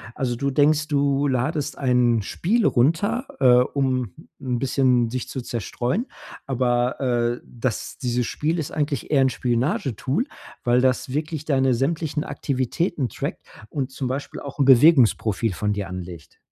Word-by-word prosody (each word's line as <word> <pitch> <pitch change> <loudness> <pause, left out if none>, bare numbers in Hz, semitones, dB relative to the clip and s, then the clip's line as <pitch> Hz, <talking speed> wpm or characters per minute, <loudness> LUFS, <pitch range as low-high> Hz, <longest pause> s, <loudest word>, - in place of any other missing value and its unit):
Also, 125 -2 -1
du 140 +3 -1
denkst, 150 +2 +3
du 140 -1 +1
ladest 145 +3 -1
ein 125 -4 +2
Spiel 210 - 0
runter, 200 - +2
äh, 125 -2 +6
um 130 -4 0 0.3
'n 125 -2 -1
bisschen 125 -2 +2
sich 130 0 -4
zu 130 - -4
zerstreuen. 120 - -2 0.4
Aber, 125 -1 0
äh, 120 -2 0
das 120 -2 -4
dieses 125 -2 -1
Spiel 160 +8 -1
ist 155 -4 -3
eigentlich 145 -1 -2
eher 140 -2 +4
'n 130 - +4
Spionagetool, 130 - -1 0.4
weil 125 -1 +3
das 130 0 0
wirklich 155 +1 -3
deine 135 -3 +2
sämtlichen 150 +3 -1
Aktivitäten 135 +2 -2
trackt - - -5 0.3
und 135 -3 -3
zum 130 0 -4
Beispiel 135 +3 -4
auch 140 - -8
'n 140 - +2
Bewegungsprofil 120 - +5
von 105 +4 -1
dir 100 -2 -4
anlegt. 90 -3 -9
130 Hz, 150 wpm, -23 LUFS, 120-145 Hz, 0.4 s, äh